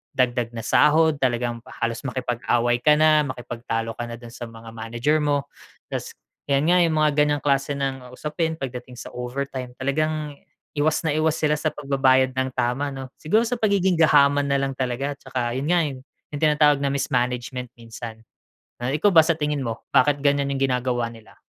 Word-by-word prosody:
dagdag 120 -2 0
na 115 - -5
sahod 155 0 +4
talagang 120 -2 0 0.2
halos 115 0 -1
makipag-away 120 -1 0
ka 150 +4 +5
na, 155 -1 +4
makipagtalo 115 -2 -4
ka 120 - -3
na 115 - -6
dun 120 -1 -12
sa 120 -1 -7
mga 115 0 -11
manager 120 +7 -1
mo. 145 -2 +1 0.5
Tapos - - -5 0.3
'yan 145 +4 +2
nga 180 - +5
yung 165 -2 +3
mga 150 - +4
ganyang 150 -1 +2
klase 140 0 +1
ng 135 -2 -4
usapin 160 +2 -2
pagdating 125 -3 -7
sa 120 - -8
overtime 125 0 -5
talagang 150 +2 -2 0.4
iwas 150 +1 +2
na 150 - +1
iwas 155 0 +1
sila 150 0 +3
sa 155 0 -1
pagbabayad 135 -2 +2
ng 130 0 -1
tama 125 +3 -1
'no. 130 -1 -7
Siguro 215 +9 +2
sa 240 0 -2
pagiging 190 -5 +2
gahaman 145 -2 +5
nalang 140 -1 0
talaga 130 +2 -2
tsaka 125 -3 -3
yun 135 +4 -3
nga, 175 -1 +3
eh, 135 -3 -4 0.3
yung 145 - -5
tinatawag 150 -1 +4
na 140 - 0
mismanagement 125 -1 -1
minsan. 115 -1 -9 0.6
Eh, 130 +4 -1
ikaw 205 - +5
ba 160 -2 +7
sa 165 0 +2
tingin 150 -2 -1
mo 115 -2 -5
bakit 145 +2 +4
ganyan 140 -1 +2
yung 140 -1 -2
ginagawa 125 -2 0
nila? 115 -1 -16
135 Hz, 180 wpm, -23 LUFS, 120-150 Hz, 0.6 s, ba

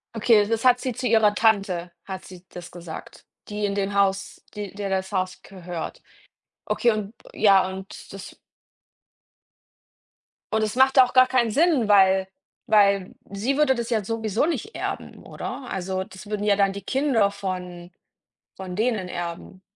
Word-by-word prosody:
Okay, 210 -2 +4
das 225 +1 -1
hat 250 0 +5
sie 255 -2 -3
zu 250 +2 -3
ihrer 215 -2 +4
Tante, 195 -6 +1
hat 190 -1 -7
sie 185 -1 -12
das 175 -1 -10
gesagt, 170 -2 -10 0.2
die 210 0 -2
in 200 0 -2
dem 200 0 -1
Haus, 200 0 0
die 205 -3 -6
der 200 -1 -4
das 190 +1 -2
Haus 185 -1 -2
gehört. 180 -3 -7 0.6
Okay, 240 - +2
und 215 +1 -4 0.2
ja, 195 -3 +4
und 190 +1 -9
das 195 -1 -10 2.2
Und 220 - +2
es 215 +2 -2
macht 265 +1 +5
auch 250 - +2
gar 255 0 +6
keinen 240 -4 +1
Sinn, 295 -5 +3
weil 190 -2 +5 0.4
weil 200 -3 +3 0.2
sie 225 +8 -1
würde 280 -3 +3
das 235 0 -4
ja 220 -3 0
sowieso 220 +4 -1
nicht 345 +7 -3
erben, - - -5
oder? 255 - -7
Also, 190 0 -3
das 190 +2 -13
würden 210 -1 -3
ja 205 -1 +3
dann 195 -1 +2
die 200 - -7
Kinder 260 -7 +1
von 180 -3 -6 0.7
von 185 -1 -7
denen 215 -5 0
erben. 175 +2 -6
200 Hz, 160 wpm, -24 LUFS, 190-225 Hz, 2.2 s, gar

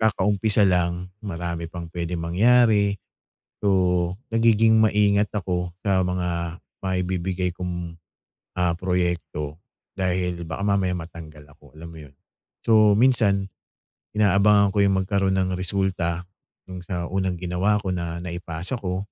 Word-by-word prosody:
kakaumpisa 105 0 +2
lang, 90 -1 0
marami 85 -4 -4
pang 85 -1 -7
pwedeng 85 0 -3
mangyari. 105 +3 +3 0.7
So, 90 -2 +2 0.2
nagiging 115 -1 +4
maingat 105 -1 +3
ako 90 -2 -2 0.2
sa 95 -2 +3
mga 90 -1 -2 0.2
maibibigay 90 -1 -1
kong, 85 -2 -5 0.6
ah, 90 -1 +2
proyekto 85 -4 -2 0.4
dahil 90 -2 -1
baka 80 +5 -4
mamaya 95 -2 +1
matanggal 80 -3 -10
ako, - - -21
alam 85 +1 -9
mo 80 - -11
yun? 70 - -25 0.5
So, 110 -2 +5
minsan 105 -6 +3 0.7
inaabangan 100 0 +4
ko 100 - +4
yung 95 -1 +3
magkaroon 95 -1 +1
ng 95 -1 0
resulta 90 -2 -2 0.4
yung 90 -1 -7
sa 90 -3 -3
unang 95 -1 -1
ginawa 90 +4 +1
ko 95 -3 -3
na 85 -1 -4
naipasa 90 +5 -5
ko. 95 0 -3
90 Hz, 125 wpm, -24 LUFS, 85-100 Hz, 0.7 s, So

